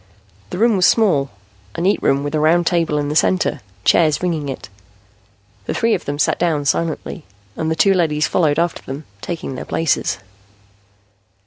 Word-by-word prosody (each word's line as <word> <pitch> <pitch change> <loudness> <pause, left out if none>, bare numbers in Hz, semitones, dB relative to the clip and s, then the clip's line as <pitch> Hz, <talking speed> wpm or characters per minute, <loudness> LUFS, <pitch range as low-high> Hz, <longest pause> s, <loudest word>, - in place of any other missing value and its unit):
The - - -5
room 225 +2 +3
was 180 - +5
small, 165 - +3 0.5
a - - -3
neat 195 +4 +2
room 140 +1 +2
with 145 +1 -4
a 155 - +1
round 165 +3 +3
table 165 -4 +1
in 145 -1 -1
the 150 - -3
center, 185 +4 +1 0.2
chairs 155 - +3
ringing 160 -5 -1
it. 135 - -6 1.0
The - - -3
three 230 0 +2
of - - -2
them 145 0 -3
sat 145 - +1
down 160 -4 0
silently, 165 +2 -2 0.3
and 160 - -2
the 160 - 0
two 195 +4 +4
leadys 155 -5 +1
followed 155 -5 +1
after 170 +1 0
them, 135 +3 -7 0.2
taking 165 -5 -5
their 130 - -6
places. 160 -2 0
160 Hz, 180 wpm, -19 LUFS, 145-175 Hz, 1.0 s, was